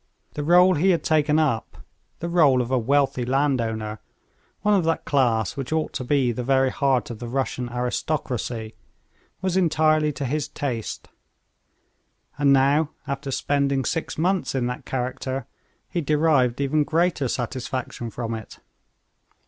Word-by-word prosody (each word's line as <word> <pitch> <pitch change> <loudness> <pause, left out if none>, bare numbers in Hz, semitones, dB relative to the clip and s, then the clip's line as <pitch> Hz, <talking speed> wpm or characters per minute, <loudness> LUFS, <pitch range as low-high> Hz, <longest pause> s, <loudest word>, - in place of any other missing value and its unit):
The 150 - -4
rôle 175 +2 +5
he 190 +5 +3
had 175 -3 +2
taken 155 -1 +2
up, 140 -9 0 0.4
the 170 - -2
rôle 155 -7 +4
of 125 0 -2
a 130 - +3
wealthy 135 +1 +1
landowner, 115 -5 0 0.6
one 210 +1 +3
of 195 -3 +3
that 165 0 0
class 120 -7 +1
which 135 0 -5
ought 160 0 -1
to 130 - -3
be 130 -1 +2
the 125 +2 -4
very 135 0 +2
heart 135 -3 +1
of 115 - -8
the 120 - -6
Russian 125 -1 -2
aristocracy, 125 -2 -3 0.7
was 185 -1 0
entirely 155 -3 +3
to 140 +1 -4
his 145 +3 -1
taste; 120 -6 -4 1.3
and 140 -1 +4
now, 140 +3 +4 0.2
after 140 0 -4
spending 140 0 0
six 165 0 -2
months 175 -4 0
in 125 -2 0
that 125 +1 -5
character, 130 0 -3 0.4
he 175 - -2
derived 145 -5 +2
even 145 +2 +2
greater 165 -2 +1
satisfaction 125 0 -4
from 115 0 -4
it. 110 -1 -8
135 Hz, 150 wpm, -24 LUFS, 125-155 Hz, 1.3 s, rôle